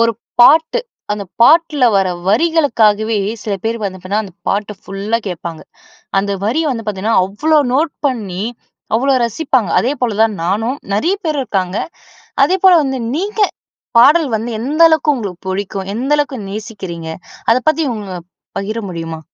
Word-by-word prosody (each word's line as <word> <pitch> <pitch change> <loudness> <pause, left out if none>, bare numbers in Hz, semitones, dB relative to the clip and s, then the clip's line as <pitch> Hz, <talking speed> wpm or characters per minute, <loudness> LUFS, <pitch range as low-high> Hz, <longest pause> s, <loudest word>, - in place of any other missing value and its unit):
ஒரு 230 0 +3 0.3
பாட்டு 320 - +6 0.3
அந்த 205 -1 -4 0.2
பாட்டுல 305 +1 +5
வர 195 -1 +2 0.2
வரிகளுக்காகவே 225 -6 +2 0.3
சில 210 - -3
பேரு 230 +1 -1
வந்து 190 -2 -4
பாத்தீங்கனா 195 +3 -2
அந்த 190 - -11 0.2
பாட்டு 205 +1 -1
ஃபுல்லா 200 +4 -2
கேட்பாங்க. 170 -2 -6 0.6
அந்த 200 +1 0
வரிய 275 +10 +1
வந்து 225 -2 -5
பார்த்தீங்கன்னா 210 +2 0
அவ்ளோ 300 +10 +2
நோட் 305 +2 +1
பண்ணி 205 -8 -3 0.5
அவ்ளோ 270 +4 +2
ரசிப்பாங்க. 235 - 0
அதேபோல 250 -4 -1
தான் 225 -1 +2
நானும், 225 +9 0 0.2
நிறைய 335 - +1
பேர் 310 -2 -1
இருக்காங்க. 190 -4 -2 0.7
அதேபோல 375 0 +4
வந்து 265 -1 -2 0.2
நீங்க 400 +6 -2 0.6
பாடல் 295 +5 +6
வந்து 225 +3 -4
எந்த 290 +7 -3
அளவுக்கு 315 -2 +3
உங்களுக்கு 200 -8 -6
புடிக்கும்? 195 0 -3
எந்த 255 +5 -3
அளவுக்கு 285 -3 -1
நேசிக்கிறீங்க? 195 -6 -6 0.4
அதை 230 - +5
பத்தி 315 +1 +2
உங்க 205 -3 -7 0.5
பகிர 215 +3 -3
முடியுமா? 165 -2 -5
225 Hz, 145 wpm, -16 LUFS, 200-290 Hz, 0.7 s, பாட்டு